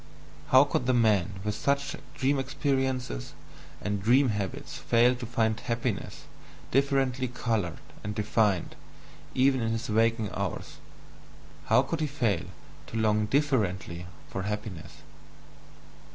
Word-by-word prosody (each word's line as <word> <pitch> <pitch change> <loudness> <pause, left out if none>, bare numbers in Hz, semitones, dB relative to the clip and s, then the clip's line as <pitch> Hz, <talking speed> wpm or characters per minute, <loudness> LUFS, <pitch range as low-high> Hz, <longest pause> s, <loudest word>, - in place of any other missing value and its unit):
how 130 +1 +7
could 130 -3 -1
the 130 - +3
man 105 -5 +3
with 105 0 -1
such 140 +4 0 0.2
dream 140 0 +1
experiences 130 - -1 0.5
and 105 -1 -2
dream 125 +6 +4
habits 100 -3 -4
fail 120 +2 +4
to 125 -1 -6
find 110 -2 +1
"happiness" 115 -3 -3 0.5
differently 135 -1 +2
coloured 110 -8 -1 0.3
and 105 0 -4
defined, 105 -3 +1 0.6
even 130 0 +3
in 115 0 0
his 115 -1 -3
waking 115 0 +2
hours! 100 -3 -4 0.9
How 125 +4 +5
could 165 +4 -3
he 155 - 0
fail 120 - 0 0.4
to 115 - -5
long 105 -1 +2
DIFFERENTLY 105 - 0 0.2
for 95 - -4
happiness? 105 -3 -5
115 Hz, 125 wpm, -28 LUFS, 105-130 Hz, 0.9 s, how